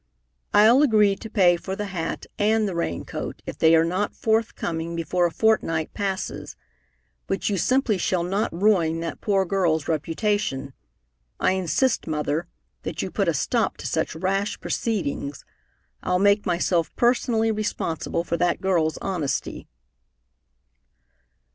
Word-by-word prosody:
"I'll 230 +6 +6
agree 210 -8 +4
to 225 - -9
pay 180 -5 +4
for 190 +2 -5
the 210 - -3
hat 165 -2 -3
and 215 +1 +2
the 190 - -3
rain 170 - -2
coat - - -6
if - - -7
they 160 0 +6
are 165 0 +4
not 185 +5 -1
forthcoming 170 -7 -1
before 175 +2 +1
a - - -6
fortnight 165 -8 +1
passes, 195 -2 -4 0.7
but 195 +2 -1
you 200 - 0
simply 250 -2 +2
shall 175 0 0
not 195 +4 -1
ruin 170 -4 +2
that 165 - -5
poor 195 -2 +2
girl's 170 -5 +1
reputation. 165 -3 -1 0.7
I - - +3
insist, 190 - 0
Mother, 155 +1 -1 0.3
that - - -4
you - - -4
put - - 0
a - - +3
stop - - 0
to - - -9
such - - -1
rash 195 +4 -1
proceedings. 145 - -3 0.6
I'll 180 - +1
make 200 +2 +3
myself 175 -1 +1
personally 235 -2 +2
responsible 205 -6 -2
for 170 0 -2
that 175 0 +1
girl's 165 -5 +1
honesty." 175 -8 -3
185 Hz, 140 wpm, -24 LUFS, 165-210 Hz, 0.7 s, I'll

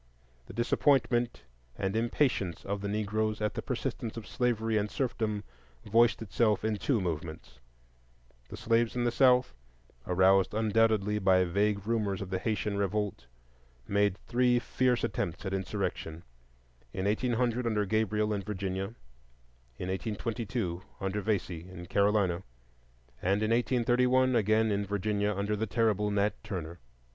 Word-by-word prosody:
The - - -10
disappointment 120 - +1 0.3
and 95 0 -2
impatience 115 - 0
of 100 0 -3
the 100 - -3
Negroes 110 +1 -1
at 105 -1 -1
the - - -3
persistence 115 0 -4
of 115 - -6
slavery 115 -3 0
and 105 0 +1
serfdom 110 -6 -2 0.4
voiced 115 -1 +3
itself 110 0 +1
in 110 -1 0
two 125 +2 +1
movements. 80 -6 -5 0.9
The - - -8
slaves 115 0 +1
in 120 - 0
the 120 - +2
South, 125 0 +4 0.5
aroused 95 +2 +4
undoubtedly 110 -1 +2
by 95 -2 +4
vague 100 +3 0
rumors 105 -4 0
of 100 -1 -6
the 95 - 0
Haytian 105 0 -1
revolt, 100 - -2 0.6
made 100 -1 +2
three 125 0 +3
fierce 125 0 +1
attempts 85 +5 -2
at 95 - -2
insurrection,—in 60 -6 -6
1800 120 +2 0
under 105 -2 +1
Gabriel 105 0 +1
in 100 - -2
Virginia, 95 +1 -4 0.8
in 90 - -4
1822 105 -1 -3 0.2
under 95 +1 -2
Vesey 95 -4 -2
in 90 -1 -9
Carolina, 100 -2 +2 0.8
and 100 +3 +1
in 110 - +1
1831 125 +1 +3
again 110 0 +3
in 100 0 0
Virginia 105 +1 0
under 100 +2 -1
the 110 +2 -2
terrible 105 -1 +1
Nat 100 +1 0
Turner. 85 -3 -5
105 Hz, 135 wpm, -30 LUFS, 95-115 Hz, 0.9 s, South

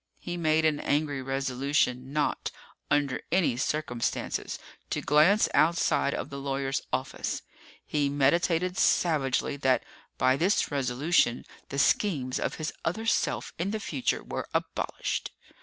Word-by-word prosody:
He 175 - -5
made 160 -2 +2
an 150 -2 +2
angry 145 -2 0
resolution 135 0 0
not, 150 0 0 0.4
under 145 -2 +1
any 175 -8 +3
circumstances, 125 -2 -2 0.3
to - - -1
glance 155 +9 +4
outside 165 -3 +3
of - - -5
the 140 - -5
lawyer's 135 0 -1
office. - - -2 0.4
He 145 -2 0
meditated 170 +6 +2
savagely 145 -4 +2
that, 130 -2 +2 0.3
by 130 +1 +3
this 185 +4 +2
resolution, 135 0 +1 0.2
the 140 - -4
schemes 140 -4 +2
of - - -2
his 155 -1 -4
other 220 +7 -2
self 225 - 0
in 180 +3 0
the 215 +1 -2
future 145 -10 -1
were - - -5
abolished. - - -2
145 Hz, 130 wpm, -28 LUFS, 135-165 Hz, 0.4 s, glance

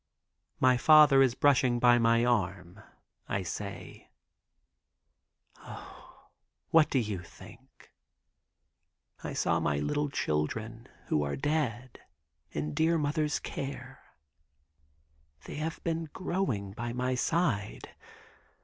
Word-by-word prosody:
My 130 -1 +4
father 150 -1 +7
is 130 -3 +3
brushing 130 -3 +3
by 120 0 +5
my 115 0 +3
arm. 95 -5 -1 0.5
I 95 - -1
say: 100 +3 -7 1.5
"O, - - -13 0.4
what 160 -2 +5
do - - 0
you 105 -7 -2
think, 115 +8 -16 1.3
I - - -4
saw - - +1
my 75 - 0
little 110 - -1
children 110 - -3 0.2
who 75 - +2
are 70 -1 -2
dead, 130 -4 -2 0.5
in 75 +2 -4
dear 165 +1 +2
mother's 150 0 0
care. 135 0 -7 1.5
They - - -7
have 160 +2 -4
been 165 -1 -2
growing 170 - -2
by 120 +3 -5
my 125 +1 -1
side. 125 - -1
125 Hz, 105 wpm, -29 LUFS, 105-145 Hz, 1.5 s, father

